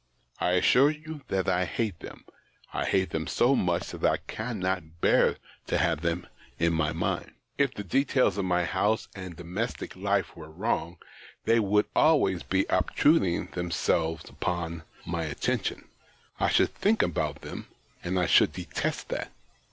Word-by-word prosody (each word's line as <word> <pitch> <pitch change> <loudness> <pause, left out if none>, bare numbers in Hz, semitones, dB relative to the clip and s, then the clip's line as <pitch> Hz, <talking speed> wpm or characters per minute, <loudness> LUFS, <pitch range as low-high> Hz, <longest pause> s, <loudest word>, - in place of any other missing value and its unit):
I 90 - +1
assure 125 +10 +5
you 155 0 -7
that 95 -1 -1
I 90 0 +2
hate 100 0 -2
them; - - -11 0.5
I - - -1
hate 95 -1 +1
them 80 0 -2
so 125 +3 +3
much 90 -6 0
that - - -9
I - - +4
cannot 95 -7 -3
bear - - +4 0.3
to - - +1
have 75 - +1
them 85 +1 -1 0.3
in 85 0 +2
my 80 0 +1
mind. 85 +2 -2 0.3
If 140 -2 +2
the 105 - -5
details 130 - +2
of 95 - 0
my 90 -1 +2
house 105 +5 0
and 95 -3 -8
domestic 90 +8 -4
life - - 0
were 80 -1 -10
wrong, 85 -1 -2 0.5
they 115 0 +4
would 105 0 +3
always 140 - +4
be 95 0 +1
obtruding 95 - +2
themselves 85 -2 -1
upon 85 -2 -3 0.2
my 85 -1 -2
attention: 75 -3 -2 0.5
I - - +2
should - - +3
think 215 +3 +2
about 85 - -2
them, - - -7 0.4
and 90 +1 0
I 90 - +2
should - - +5
detest - - -3
that. - - -3
90 Hz, 160 wpm, -28 LUFS, 85-110 Hz, 0.5 s, assure